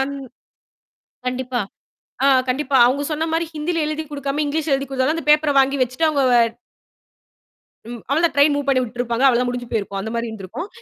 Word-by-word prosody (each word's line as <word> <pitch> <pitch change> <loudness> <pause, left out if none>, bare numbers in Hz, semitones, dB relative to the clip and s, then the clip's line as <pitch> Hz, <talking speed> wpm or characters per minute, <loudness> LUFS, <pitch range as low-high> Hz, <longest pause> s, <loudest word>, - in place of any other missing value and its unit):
An 275 +1 -2 1.1
கண்டிப்பா. 250 0 -2 0.6
ஆ - - +5 0.2
கண்டிப்பா. 275 +2 0
அவுங்க 270 +4 0
சொன்னமாரி 320 +2 -1
ஹிந்தில 320 +2 -1
எழுதிக் 310 0 -4
கொடுக்காம, 285 +1 -2
இங்கிலீஷ்ல 305 +1 -1
எழுதிக் 275 0 -3
கொடுத்தாலும் 270 +4 0
அந்த 330 - -6
பேப்பர 300 0 +4
வாங்கி 270 +1 +1
வச்சுட்டு 255 +6 0
அவுங்க 290 -3 +1 1.7
ம். 240 -1 -7
அவ்ள 285 +3 +2
தான் 340 - +2
ட்ரெயின் 285 +1 +5
மூவ் 285 -1 -2
பண்ணி 265 -2 +3
விட்டிருப்பாங்க. 240 +1 -2
அவ்வளவு 245 -2 +4
தான் 250 - 0
முடிஞ்சு 245 -1 -5
போயிருக்கும். 200 -3 -3
அந்தமாரி 230 +3 -3
இருந்திருக்கும். 220 - -7
275 Hz, 165 wpm, -20 LUFS, 245-300 Hz, 1.7 s, ஆ